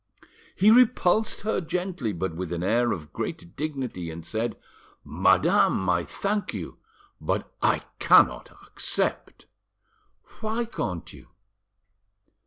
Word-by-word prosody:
He 205 +3 +5
repulsed 220 -3 +4
her 215 -2 -1
gently, 175 - -2
but 90 -2 -3
with 90 0 -5
an 85 0 -2
air 120 +5 +2
of 75 -4 -5
great 85 - -5
dignity, 130 - -4
and 80 0 -8
said— 110 +4 -2 0.5
"Madame, 95 - +3
I 85 -1 +1
thank 200 - -2
you, - - -7 0.4
but - - -2
I - - +2 0.2
cannot - - +5 0.2
accept." - - -3 0.9
"Why 225 +2 -2
can't 90 - -5
you?" - - -14
120 Hz, 115 wpm, -26 LUFS, -, 0.9 s, He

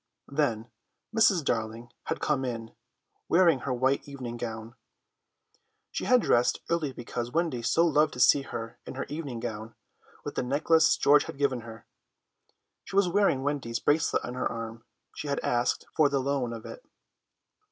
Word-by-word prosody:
Then 120 -6 -1 0.4
Mrs. 195 -8 +4
Darling 115 0 -2
had - - -2
come 145 -3 0
in, 115 -3 -5 0.6
wearing 170 -5 +5
her 135 - -4
white 130 +3 +1
evening 130 -4 -6
gown. 115 -1 -6 1.2
She - - -3
had 250 -2 +4
dressed 120 0 +3
early 160 -4 0
because 120 -1 -5
Wendy 160 -6 0
so 165 +8 +3
loved 150 -2 +3
to 125 - -8
see 135 +2 +6
her 115 -4 -7
in - - -7
her 135 - -3
evening 145 -6 -5
gown, 110 -1 -6 0.5
with - - -4
the - - -1
necklace 155 +5 +3
George 145 +1 +5
had - - -8
given 135 -4 0
her. 115 0 -11 1.0
She - - -9
was 200 -2 +4
wearing 185 -8 +2
Wendy's 135 -5 -2
bracelet 150 +5 +1
on 125 - -5
her 125 - -2
arm; 115 0 -6 0.3
she 150 - -6
had 140 - -1
asked 120 0 0
for 150 -2 +4
the 140 - 0
loan 135 -2 -1
of 115 -1 -7
it. - - -9
130 Hz, 165 wpm, -28 LUFS, 115-150 Hz, 1.2 s, see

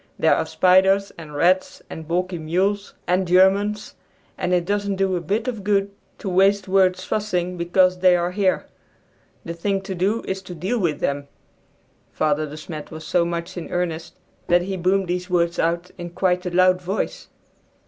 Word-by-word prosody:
There - - +4
are - - -1
spiders, 190 +2 +3
and 155 -3 -10
rats, 180 +5 +1
and 160 -1 -9
balky 180 +1 -1
mules, 190 +6 -1
and 180 +1 +1
Germans, 195 +4 +3 0.4
and 180 - -2
it 175 -1 +2
doesn't 205 0 -1
do 190 -1 0
a 175 - -2
bit 210 - -2
of 225 -5 -4
good 200 0 +1 0.3
to - - -8
waste 195 +1 +3
words 185 -1 +2
fussing 180 -3 -2
because 180 +1 +2
they 180 -1 +5
are 175 0 0
here. 190 -1 0 0.8
The 170 - -4
thing 195 +4 -1
to 195 0 -5
do 195 +5 0
is 190 0 -3
to 185 -2 -9
deal 190 +9 -2
with 160 -7 -1
them!" 140 0 -2 0.8
Father 155 0 0
De 150 +1 -9
Smet 155 -1 -8
was 155 0 -9
so 175 -2 +2
much 170 +1 -4
in 175 - -6
earnest 170 -2 -3 0.3
that 175 0 +3
he 190 +1 -3
boomed 190 +1 +1
these 180 +1 -3
words 170 -1 +1
out 170 +2 -1
in 175 0 -5
quite 180 +1 0
a - - 0
loud 185 +1 +3
voice. 190 +4 -3
180 Hz, 180 wpm, -22 LUFS, 170-195 Hz, 0.8 s, they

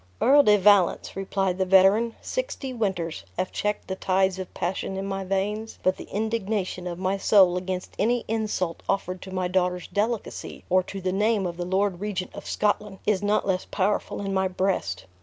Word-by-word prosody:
"Earl 285 +3 +6
de 210 -6 +5
Valence," 200 -2 +3
replied 195 -1 -1
the - - +3
veteran, 195 +5 +5
"sixty - - -3
winters 190 -8 -2
have 185 +1 -1
checked 210 0 -2
the 190 - -3
tides 190 0 +1
of 185 - -6
passion 190 +2 -2
in 195 - -3
my 195 0 -3
veins; 205 +4 -2
but 185 0 +2
the - - -8
indignation 210 -4 -2
of 175 -1 -4
my 190 +2 0
soul 190 -2 +5
against 180 0 -4
any 235 +3 +1
insult 210 -6 -2
offered 185 -2 -1
to 190 - -9
my 185 -1 -1
daughter's 180 -1 0
delicacy, 220 +2 -3
or 185 0 +5
to 195 +1 -7
the 185 0 -1
name 210 0 +2
of 175 -1 -3
the 175 0 -4
lord 190 0 0
regent 195 -3 -3
of - - -9
Scotland 210 -1 0
is 205 -2 +2
not 205 +1 +1
less 185 -1 0
powerful 200 +1 -1
in 195 -1 -3
my 190 0 +2
breast. 185 - -1
195 Hz, 190 wpm, -25 LUFS, 185-210 Hz, -, Earl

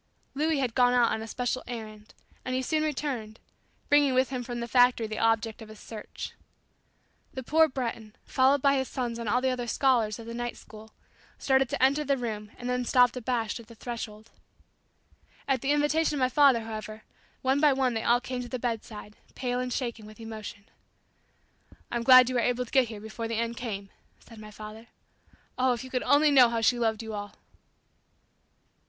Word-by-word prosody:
Louis 310 +2 0
had 255 -4 -1
gone 245 0 +4
out 245 -2 +4
on 220 - -2
a 225 - -6
special 250 +2 -2
errand, 215 -3 -8 0.3
and 255 0 -3
he 260 - -1
soon 310 +4 0
returned, 260 -8 -3 0.5
bringing 290 -2 +4
with 255 0 +2
him 255 -2 -3
from 240 0 -5
the 235 - -4
factory 245 -1 +4
the 215 0 -5
object 225 0 +1
of 220 - -10
his 215 -1 -12
search. 215 -2 -8 1.0
The 260 - -5
poor 320 +5 +4
Breton, 230 -5 -5
followed 265 +1 +3
by 275 -1 +5
his 265 -1 -1
sons 240 -2 -4
and 230 -2 -3
all 250 +4 +2
the 260 0 +1
other 245 -1 -3
"scholars" 235 -4 +2
of 230 - -10
the 230 - -7
night 240 0 -4
school, 220 0 -14 0.4
started 265 -1 +2
to - - -1
enter 280 +3 +3
the 280 -1 +1
room 215 -4 -5
and 245 - -6
then 250 0 0
stopped 245 0 +4
abashed 240 -2 -2
at 230 - -13
the 230 - -14
threshold. 220 -2 -7 1.2
At 265 -3 +1
the 275 - -2
invitation 295 +2 +2
of - - -2
my 255 -1 +2
father 270 -3 +5
however, 215 -1 -7 0.4
one 265 +2 +2
by 295 -1 +5
one 260 -2 +1
they 225 - -2
all 240 +1 +4
came 250 0 -5
to 245 - -7
the 255 - -3
bedside, 220 -3 -5 0.2
pale 250 -1 -2
and 250 0 -3
shaken 235 -4 -4
with 215 0 -14
emotion. 215 -2 -8 1.3
"I'm 240 - -1
glad 255 0 +8
you 255 - -2
were 245 - +2
able 245 +1 0
to - - -17
get 265 -3 +4
here 215 -2 -8
before 220 +1 -6
the 230 - -3
end 235 +1 -2
came," 200 -5 -6 0.3
said 230 -2 -15
my 215 0 -10
father. 215 +2 -10 0.7
"Oh, 255 0 +3
if 240 - -5
you 260 - -10
could 250 - -1
only 295 +1 +4
know 255 -4 +7
how 230 0 -1
she 240 +2 +2
loved 225 -1 0
you 220 -1 -6
all!" 205 -1 -6
245 Hz, 205 wpm, -28 LUFS, 225-260 Hz, 1.3 s, glad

